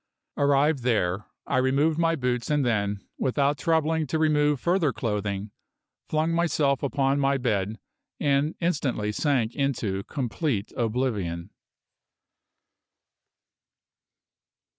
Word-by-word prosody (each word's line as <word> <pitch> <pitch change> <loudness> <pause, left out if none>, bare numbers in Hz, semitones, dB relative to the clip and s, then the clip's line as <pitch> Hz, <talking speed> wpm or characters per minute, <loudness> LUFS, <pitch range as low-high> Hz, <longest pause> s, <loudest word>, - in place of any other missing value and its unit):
Arrived 145 0 +3
there, 105 -5 0 0.2
I 135 - 0
removed 140 +5 +2
my 165 0 +3
boots 125 -4 -1
and 145 -3 +2
then, 100 -4 -1
without 140 +2 +1
troubling 160 -1 +1
to 160 - -1
remove 150 -2 +2
further 170 -3 +2
clothing, 105 -3 -3 0.6
flung 155 +1 +1
myself 155 -5 +1
upon 140 0 +1
my 140 0 +2
bed 110 -4 -1 0.4
and 145 +1 +1
instantly 135 -11 0
sank 125 -2 0
into 115 -9 -1
complete 125 -4 -2
oblivion. 105 -7 -2
135 Hz, 100 wpm, -26 LUFS, 110-150 Hz, 0.6 s, Arrived